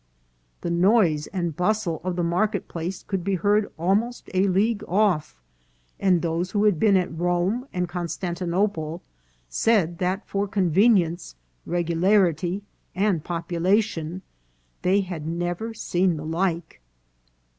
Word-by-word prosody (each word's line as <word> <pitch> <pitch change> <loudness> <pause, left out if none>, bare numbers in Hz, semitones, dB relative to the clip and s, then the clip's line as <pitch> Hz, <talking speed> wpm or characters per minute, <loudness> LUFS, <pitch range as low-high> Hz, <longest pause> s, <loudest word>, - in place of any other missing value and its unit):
" - - -42
The 170 - -2
noise 170 -4 +3
and 175 -5 -3
bustle 180 -2 0
of 185 -1 -2
the 175 - -1
market 180 +6 0
place 175 +2 -5
could 190 -3 -3
be 195 +1 0
heard 205 +3 +1
almost 205 +9 0
a 190 +2 +3
league 205 +3 +1
off, 180 - +1 0.6
and 180 -3 +3
those 170 +2 -1
who 205 -1 +2
had 205 -7 +3
been 205 -3 +5
at 180 -2 -1
Rome 175 +9 0
and 180 -1 -1
Constantinople 175 0 -2 0.4
said 175 - +1
that 185 +3 -1
for 200 +1 -1
convenience, 185 - +2 0.3
regularity, 175 +1 +1 0.3
and 190 -5 +1
population 175 +1 -1 0.6
they 195 +3 +3
had 175 -5 -6
never 175 +6 -2
seen 180 -5 0
the 150 - -6
like." 165 - -2
180 Hz, 130 wpm, -24 LUFS, 170-200 Hz, 0.6 s, been